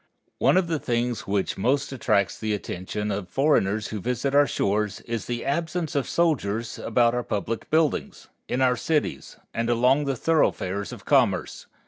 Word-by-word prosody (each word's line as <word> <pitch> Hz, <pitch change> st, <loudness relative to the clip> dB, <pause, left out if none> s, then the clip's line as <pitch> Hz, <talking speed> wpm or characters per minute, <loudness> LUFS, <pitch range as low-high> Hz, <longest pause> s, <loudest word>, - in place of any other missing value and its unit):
One -, -, +4 dB
of 185 Hz, -, +3 dB
the 165 Hz, -2 st, -1 dB
things 120 Hz, -1 st, -1 dB
which 100 Hz, -1 st, -1 dB
most 135 Hz, +7 st, +1 dB
attracts 105 Hz, -6 st, +1 dB
the 110 Hz, -1 st, -1 dB
attention 105 Hz, +2 st, -4 dB
of 95 Hz, -2 st, -4 dB
foreigners 110 Hz, -, +1 dB
who 110 Hz, -, -4 dB
visit 125 Hz, +5 st, -1 dB
our 145 Hz, 0 st, +5 dB
shores 105 Hz, +1 st, -1 dB
is 115 Hz, -3 st, -4 dB
the 120 Hz, -1 st, -3 dB
absence 160 Hz, +3 st, -1 dB
of 140 Hz, -4 st, -1 dB
soldiers 120 Hz, -10 st, 0 dB
about 120 Hz, -1 st, +2 dB
our 125 Hz, -, 0 dB
public 110 Hz, 0 st, -3 dB
buildings, 155 Hz, -1 st, 0 dB, 0.2 s
in 125 Hz, -, -1 dB
our 125 Hz, -1 st, +4 dB
cities, 150 Hz, +5 st, -2 dB, 0.2 s
and 115 Hz, +1 st, -1 dB
along 125 Hz, +5 st, +3 dB
the 135 Hz, -1 st, 0 dB
thoroughfares 105 Hz, -, 0 dB
of -, -, -10 dB
commerce. -, -, +1 dB
120 Hz, 165 wpm, -25 LUFS, 105-140 Hz, 0.2 s, our